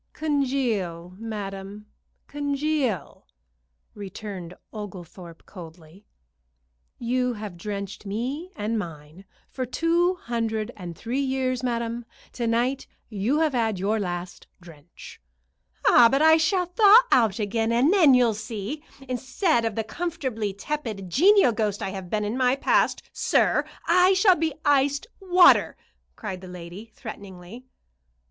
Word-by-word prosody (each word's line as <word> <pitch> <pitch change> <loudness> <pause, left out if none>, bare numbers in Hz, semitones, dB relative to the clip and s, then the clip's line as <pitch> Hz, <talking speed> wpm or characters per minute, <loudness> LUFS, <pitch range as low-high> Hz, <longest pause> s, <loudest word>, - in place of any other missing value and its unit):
"Congeal, 240 - -1
madam, 205 -2 -6 0.4
congeal!" 285 - -2 0.7
returned 195 -3 -8 0.2
Oglethorpe, 180 -5 -10
coldly. 170 +1 -13 0.9
"You 250 +1 -1
have 210 -4 -7
drenched 200 +2 -6
me 260 - -4
and 220 -2 -2
mine 165 0 -9 0.3
for 260 - -3
two 335 +8 +1
hundred 225 -7 -3
and 175 -4 -8
three 245 +6 -3
years, 260 -2 -1
madam. 235 -1 -3 0.3
To 235 -2 -3
night 245 +4 0 0.2
you 225 +9 0
have 310 -3 +1
had 225 -4 0
your 205 +4 0
last 175 -2 -5
drench." 170 - -14 0.7
"Ah, 235 -2 +7
but 275 +4 +2
I 320 0 +7
shall 360 +3 +1
thaw 415 +6 +6
out 225 -6 +3
again, 225 +1 -1
and 255 +9 +3
then 320 -10 +6
you'll 245 -3 +3
see. 220 +6 -6 0.2
Instead 255 - 0
of 225 -2 -2
the 225 - -1
comfortably 260 - -3
tepid, 210 -4 -5
genial 385 - +5
ghost 210 -2 -2
I - - -2
have 190 -2 -7
been 210 +1 -1
in 210 +3 -2
my 255 0 +2
past, 275 - +1
sir, - - +2 0.2
I 360 +2 +5
shall 380 0 +5
be 320 -1 -2
iced 285 0 +2
water," 365 -2 +5 0.4
cried 185 -1 -6
the 185 - -10
lady, 180 +5 -10
threateningly. 200 +1 -10
230 Hz, 130 wpm, -25 LUFS, 195-280 Hz, 0.9 s, Ah